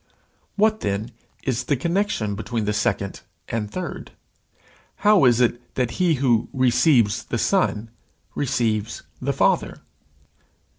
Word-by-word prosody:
What, 215 Hz, +1 st, +2 dB
then, 105 Hz, +4 st, -3 dB, 0.3 s
is 125 Hz, -2 st, -1 dB
the 145 Hz, -, +1 dB
connection 170 Hz, -, -1 dB
between 110 Hz, +2 st, -3 dB
the 105 Hz, -, 0 dB
second 100 Hz, -1 st, -1 dB, 0.3 s
and 110 Hz, -2 st, -3 dB
third? 180 Hz, -, -6 dB, 1.0 s
How 210 Hz, -8 st, +6 dB
is 120 Hz, -1 st, +4 dB
it 120 Hz, 0 st, -1 dB
that 125 Hz, -2 st, 0 dB
he 170 Hz, -3 st, +3 dB
who 125 Hz, -4 st, +1 dB
receives 125 Hz, -3 st, +3 dB
the -, -, -3 dB
Son 115 Hz, -, 0 dB, 0.4 s
receives 115 Hz, -6 st, -1 dB, 0.2 s
the -, -, 0 dB
Father? -, -, +1 dB
120 Hz, 120 wpm, -23 LUFS, 110-145 Hz, 1.0 s, How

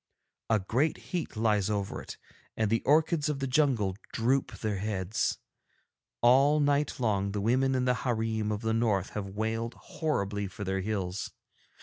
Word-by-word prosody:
A 110 Hz, -, +4 dB
great 125 Hz, +10 st, 0 dB, 0.2 s
heat 170 Hz, -10 st, -2 dB
lies 105 Hz, -3 st, +2 dB
over 100 Hz, -2 st, -2 dB
it, -, -, -9 dB, 0.4 s
and 110 Hz, -1 st, +1 dB
the 115 Hz, -, +2 dB
orchids 155 Hz, +1 st, +3 dB
of 150 Hz, -, -1 dB
the 135 Hz, -, -2 dB
jungle 125 Hz, -8 st, +2 dB, 0.2 s
droop 125 Hz, +3 st, +1 dB
their 105 Hz, 0 st, -2 dB
heads. 100 Hz, 0 st, -1 dB, 0.8 s
All 135 Hz, +5 st, +5 dB
night 145 Hz, -1 st, +1 dB
long 100 Hz, -4 st, 0 dB
the 105 Hz, -, -1 dB
women 130 Hz, +5 st, +2 dB
in 130 Hz, 0 st, +1 dB
the 125 Hz, -, +3 dB
hareem 110 Hz, -3 st, -1 dB
of 105 Hz, 0 st, -2 dB
the 110 Hz, -1 st, 0 dB
North 110 Hz, -5 st, +1 dB
have 105 Hz, -2 st, -4 dB
wailed 115 Hz, +2 st, -2 dB
horribly 105 Hz, -, -2 dB
for 105 Hz, +2 st, -7 dB
their 95 Hz, 0 st, -1 dB
hills. 95 Hz, -2 st, -3 dB
110 Hz, 160 wpm, -29 LUFS, 100-130 Hz, 0.8 s, All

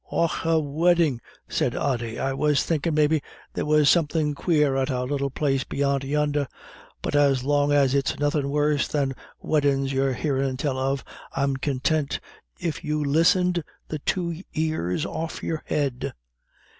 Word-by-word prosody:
"Och, 170 Hz, -1 st, +1 dB
a 165 Hz, -1 st, +3 dB
weddin'," 155 Hz, -2 st, +2 dB, 0.3 s
said -, -, 0 dB
Ody. 120 Hz, -4 st, -1 dB
"I 135 Hz, 0 st, -1 dB
was 150 Hz, +1 st, +2 dB
thinkin' 165 Hz, -1 st, 0 dB
maybe 155 Hz, 0 st, +3 dB, 0.3 s
there -, -, -2 dB
was 150 Hz, -1 st, +4 dB
somethin' 155 Hz, -2 st, +3 dB
quare 150 Hz, -3 st, +2 dB
at 135 Hz, +1 st, 0 dB
our 125 Hz, -1 st, -1 dB
little 140 Hz, +1 st, -1 dB
place 135 Hz, -1 st, 0 dB
beyant 140 Hz, -1 st, 0 dB
yonder. 145 Hz, 0 st, 0 dB, 0.6 s
But -, -, -1 dB
as 140 Hz, -3 st, +3 dB
long 145 Hz, +1 st, +2 dB
as 140 Hz, -2 st, +4 dB
it's 140 Hz, -1 st, +1 dB
nothin' 145 Hz, -1 st, 0 dB
worser 145 Hz, 0 st, +1 dB
than 140 Hz, -3 st, 0 dB, 0.3 s
weddin's 140 Hz, -3 st, +1 dB
you're 135 Hz, 0 st, +1 dB
hearin' 135 Hz, -1 st, -1 dB
tell 130 Hz, -1 st, -1 dB
of, 135 Hz, -1 st, -1 dB, 0.3 s
I'm 140 Hz, 0 st, +1 dB
contint, 140 Hz, +2 st, 0 dB, 0.4 s
if 165 Hz, -3 st, -3 dB
you 150 Hz, 0 st, -1 dB
listened 175 Hz, +4 st, +3 dB, 0.3 s
the 155 Hz, -, -3 dB
two 170 Hz, +2 st, -2 dB
ears 155 Hz, -, -1 dB
off 160 Hz, -1 st, -5 dB
your 160 Hz, -1 st, -2 dB
head." 140 Hz, -4 st, -1 dB
145 Hz, 155 wpm, -25 LUFS, 135-155 Hz, 0.6 s, was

